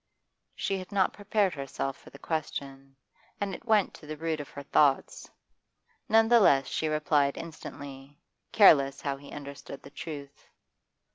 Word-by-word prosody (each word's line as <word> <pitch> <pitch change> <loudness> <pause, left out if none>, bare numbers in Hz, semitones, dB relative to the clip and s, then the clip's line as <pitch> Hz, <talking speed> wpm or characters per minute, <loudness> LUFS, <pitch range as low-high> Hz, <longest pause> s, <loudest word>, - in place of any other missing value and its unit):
She 195 -1 -2
had 185 +3 -10
not 195 -2 +2
prepared 205 -2 0
herself 135 -1 -4
for - - -16
the - - -13
question, 135 -4 -5 0.4
and 200 -1 -2
it - - -9
went 215 -4 +3
to 150 - -13
the 155 0 -6
root 160 0 -2
of 145 - -7
her 140 - -9
thoughts; 140 -1 +2 0.8
none 225 +1 +5
the 240 0 +6
less 135 -10 +5
she 160 - -2
replied 150 -2 +1
instantly, 145 -3 -9 0.3
careless 140 -10 +6
how 140 -1 -2
he 140 +1 -13
understood 140 -1 -9
the 140 - -12
truth. 145 -3 -9
150 Hz, 155 wpm, -29 LUFS, 140-185 Hz, 0.8 s, the